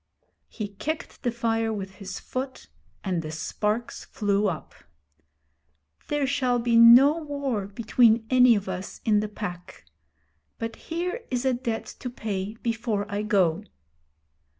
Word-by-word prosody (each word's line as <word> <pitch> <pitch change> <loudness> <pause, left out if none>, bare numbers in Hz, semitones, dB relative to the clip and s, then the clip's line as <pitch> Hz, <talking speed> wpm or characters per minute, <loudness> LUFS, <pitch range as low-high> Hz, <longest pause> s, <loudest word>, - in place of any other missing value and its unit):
He 210 -3 -5
kicked 305 +10 -5
the 245 - 0
fire 225 -1 0
with 195 -3 -6
his 195 - -6
foot, 260 +1 -6 0.3
and 180 -3 -1
the 155 - -6
sparks 210 +8 -3
flew 205 -1 0
up. 160 -4 -6 1.3
'There 295 -1 0
shall 255 -2 +1
be 235 0 +1
no 245 +7 +8
war 280 -9 -3
between 225 +2 +3
any 250 -2 +7
of 200 -2 -3
us 185 0 -5
in 215 -2 +4
the 210 - -1
Pack. 180 -4 -7 0.7
But 230 0 -4
here 355 +8 -2
is 250 0 -1
a 260 - +3
debt 240 -2 -3
to 250 - -4
pay 210 -3 -4
before 230 -3 -1
I 205 0 -1
go.' 200 -4 +2
225 Hz, 140 wpm, -26 LUFS, 205-250 Hz, 1.3 s, no